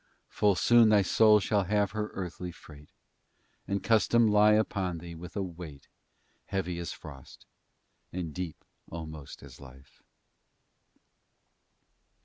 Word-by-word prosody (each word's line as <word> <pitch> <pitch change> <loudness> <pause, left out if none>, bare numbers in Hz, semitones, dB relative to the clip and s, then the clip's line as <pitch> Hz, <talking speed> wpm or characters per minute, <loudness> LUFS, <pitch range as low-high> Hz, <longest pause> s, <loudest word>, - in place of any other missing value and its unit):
Full 105 -2 +2
soon 115 +4 +5
thy 105 -2 +5
Soul 105 +2 +5
shall 100 0 0
have 105 +1 +1
her 105 +1 -3
earthly 90 -1 -5
freight, 75 -3 -15 0.8
And 100 -1 -2
custom 115 +1 +3
lie 105 0 +5
upon 100 -5 0
thee 85 +1 -9
with 85 +1 -10
a 100 - -1
weight, 85 -6 -9 0.6
Heavy 90 -3 -3
as 85 - -5
frost, 70 -4 -12 0.7
and 85 -4 -5
deep 90 -2 -6 0.2
almost 80 -3 -9
as - - -13
life! 65 0 -16
90 Hz, 125 wpm, -29 LUFS, 80-105 Hz, 0.8 s, soon